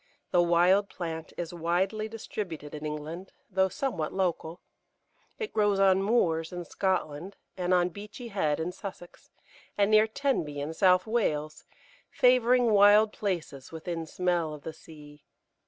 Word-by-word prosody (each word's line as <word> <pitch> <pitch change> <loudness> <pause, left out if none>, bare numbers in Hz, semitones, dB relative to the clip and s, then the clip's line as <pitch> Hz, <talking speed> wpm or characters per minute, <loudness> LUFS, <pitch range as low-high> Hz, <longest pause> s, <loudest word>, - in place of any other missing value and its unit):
The 175 - +4
wild 175 +4 +3
plant 165 -3 -6
is 175 -1 -4
widely 185 +6 -1
distributed 185 -9 -6
in 150 0 -5
England, 155 +5 -6 0.2
though 190 0 +2
somewhat 185 - -3
local. 175 -2 -2 0.8
It 440 -2 -5
grows 205 -2 +2
on 190 -1 +4
moors 170 -7 +1
in 175 -1 -6
Scotland, 185 -1 -2 0.2
and 180 -1 -2
on 180 -1 +3
Beachy 210 +6 -9
Head 155 -8 0
in 165 +2 -2
Sussex, 180 -2 -10 0.5
and 200 +1 +3
near 215 0 +6
Tenby 220 - -1
in 145 +3 -4
South 185 +1 +4
Wales, 155 -10 -1 0.4
favouring 250 -1 +4
wild 210 +1 +6
places 170 -9 -4
within 165 0 -5
smell 175 -3 -1
of 150 - -14
the 160 - -6
sea. 150 -2 -15
180 Hz, 140 wpm, -28 LUFS, 160-205 Hz, 0.8 s, near